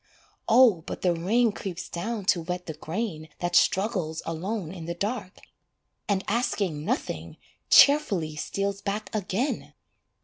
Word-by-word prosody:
Oh 230 -7 +6
but - - -6
the 180 -2 +3
rain 215 +8 +2
creeps 190 -3 -6
down 205 +4 -4
to 180 -2 +3
wet 180 +2 -4
the 160 - -5
grain 160 0 -4
That 175 0 -2
struggles 185 -6 +2
alone 170 +2 -3
in 170 -4 -8
the 170 +1 -4
dark, 200 0 -3 0.7
And 195 -1 +1
asking 200 -9 0
nothing, 250 - -3 0.3
cheerfully 200 - +5
steals 200 +5 -2
back 205 +1 -4
again! 215 +6 -2
190 Hz, 135 wpm, -27 LUFS, 170-220 Hz, 0.7 s, Oh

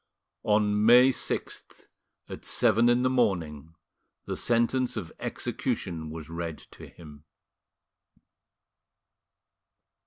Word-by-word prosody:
On 105 0 +2
May 125 +3 +7
6th, 130 - -4 0.4
at - - -9
seven 115 +3 +3
in 120 +1 +2
the - - +3
morning, 85 - -1 0.5
the - - -4
sentence 120 +1 0
of 90 -6 -6
execution 80 -2 -4
was 80 -1 -8
read 85 -1 -5
to - - -12
him. 75 -3 -14
105 Hz, 95 wpm, -27 LUFS, 80-120 Hz, 0.5 s, May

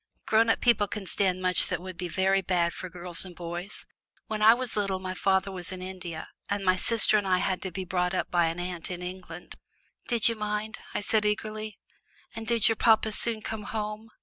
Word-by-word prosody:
"Grown 225 +1 +4
up - - +2
people 230 -4 +4
can 205 0 -5
stand 185 -1 +1
much 180 -1 +3
that - - -2
would 185 0 -7
be 180 +1 -4
very 190 +3 +2
bad 175 -2 +1
for 185 - -6
girls 175 -1 -2
and 180 -2 -9
boys. 175 +4 -6 0.4
When 215 -1 -4
I 220 +2 +8
was 255 -1 -3
little 200 -2 0
my 185 0 -4
father 190 +1 +1
was 180 -1 -4
in 185 - -6
India, 180 -3 -6 0.2
and 200 -1 -1
my 185 0 +5
sister 215 +1 +3
and 200 - -4
I 185 -1 +4
had 185 0 0
to 190 - -3
be 185 +2 -4
brought 180 0 0
up - - -2
by 175 -1 +3
an 165 +1 -3
aunt 175 -2 -4
in 180 -1 -5
England." 180 -2 -8 0.5
"Did 235 -3 +4
you 230 - +3
mind?" 210 0 -3 0.2
I - - 0
said 215 +1 +2
eagerly. 215 0 -2 0.6
"And 225 0 -6
did 230 -2 +4
your 225 -2 +2
papa 220 -1 +4
soon 220 0 -1
come 215 -2 -4
home? 215 +1 -4
190 Hz, 220 wpm, -28 LUFS, 180-215 Hz, 0.6 s, I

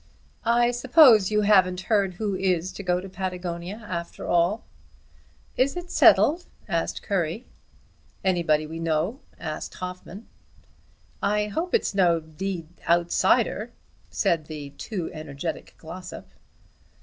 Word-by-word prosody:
"I 240 +1 +4
suppose 245 - +6
you 210 0 +2
haven't 190 -3 +4
heard 200 -4 +1
who 205 +1 -2
is 185 -1 0
to - - -8
go 180 -2 0
to 195 - -8
Patagonia 185 +1 -5
after 170 -1 -5
all?" 175 +5 +2 0.9
"Is 275 +6 +2
it 355 0 -7
settled?" 340 +4 +5 0.2
asked 170 -4 -2
Currie. 195 +4 -2 0.8
"Anybody 170 -5 +2
we 160 +2 -7
know?" 165 - -1 0.2
asked 155 -2 -5
Hoffmann. 185 +3 -8 1.0
"I 210 0 +1
hope 340 - -1
it's 460 - 0
no 175 -4 +3
d 165 +3 -5 0.2
outsider," 170 0 +2 0.4
said 170 -7 0
the 150 -3 -7
too 180 +4 -5
energetic 155 +1 -6
Glossop. 180 +3 -9
185 Hz, 120 wpm, -25 LUFS, 170-210 Hz, 1.0 s, suppose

